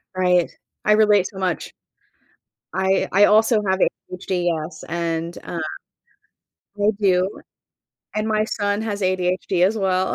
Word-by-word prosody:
Right. 180 -2 +2 0.4
I 210 - +5
relate 210 -3 +4
so 195 - -12
much. 185 -2 -2 1.0
I 190 +1 +1
I 200 +2 +6
also 220 +1 +4
have 190 0 +1
ADHD, 185 -1 -2
yes, 160 +2 -6
and, 170 0 -3
uh 170 - -5 1.2
I 205 +1 +3
do. 185 -2 +3 0.9
And 215 +1 -1
my 215 0 +1
son 205 -1 -1
has 210 -2 -3
ADHD 185 -1 +1
as 220 +3 -1
well. 185 -1 +1
190 Hz, 130 wpm, -22 LUFS, 180-205 Hz, 1.2 s, I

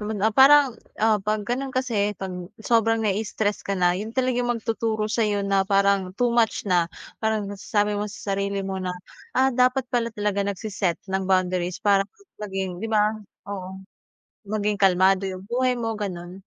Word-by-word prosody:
So, 210 - -5
man 210 -2 -3
ah, 220 - +3
parang, 275 -2 +7 0.2
ah, 215 -1 +3
'pag 215 0 -1
gano'n 265 +3 -2
kasi, 230 -6 0
'pag 190 -1 -5 0.3
sobrang 225 0 +2
nai-stress 210 0 -1
ka 195 - -2
na, 175 -1 +3
'yon 210 +4 -4
talaga 255 -1 +1
yung 245 - 0
magtuturo 225 -1 -1
sa'yo 210 -2 0
na, 195 -1 +3
parang 200 -1 +2
too 245 -1 +2
much 230 -2 +2
na, 175 -3 +2 0.3
parang 220 -2 0
nasasabi 205 +1 -1
mo 205 +1 -2
sa 200 -1 -4
sarili 200 0 -2
mo 190 -1 -3
na, 185 - -2 0.5
"Ah, 265 +1 +4
dapat 255 +1 +2
pala 235 -1 -1
talaga 205 -1 -1
nagsi-set 200 -3 -2
ng 190 0 -1
boundaries 185 -1 +1
para, 200 -1 +3
hmm, 400 - -22
maging" 195 -2 -3
'di 225 - -2
ba? 215 0 +3 0.3
Oo. 190 -1 -6 0.7
Maging 210 0 -1
kalmado 190 0 +4
yung 190 0 -5
buhay 250 +1 +1
mo, 225 -1 -2
gano'n. 185 -2 -6
205 Hz, 175 wpm, -24 LUFS, 195-225 Hz, 0.7 s, parang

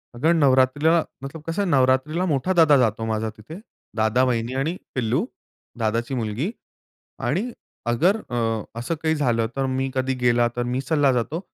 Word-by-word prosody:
अगर 155 +8 +2
नवरात्रीला 145 +2 +3 0.2
मतलब 145 +3 -7
कसं 180 +4 -1
नवरात्रीला 135 +5 +2
मोठा 160 +2 0
दादा 160 -5 +6
जातो 115 -3 +1
माझा 110 0 -1
तिथे. 135 - -10 0.4
दादा, 110 +3 +3
वहिनी 120 -1 0
आणि 160 +6 -1 0.2
पिल्लू. 125 - 0 0.5
दादाची 115 +3 -1
मुलगी 120 - -2 0.7
आणि 235 +6 0 0.4
अगर 175 - +3
अ, 115 -2 -1 0.2
असं 120 +8 -2
काही 160 0 +2
झालं 120 -7 +1
तर 135 -1 0
मी 135 0 -1
कधी 130 0 0
गेलो, 120 -1 +3
तर 120 - 0
मी 130 - 0
चालला 140 0 +2
जातो. 125 +7 -1
130 Hz, 155 wpm, -23 LUFS, 120-160 Hz, 0.7 s, दादा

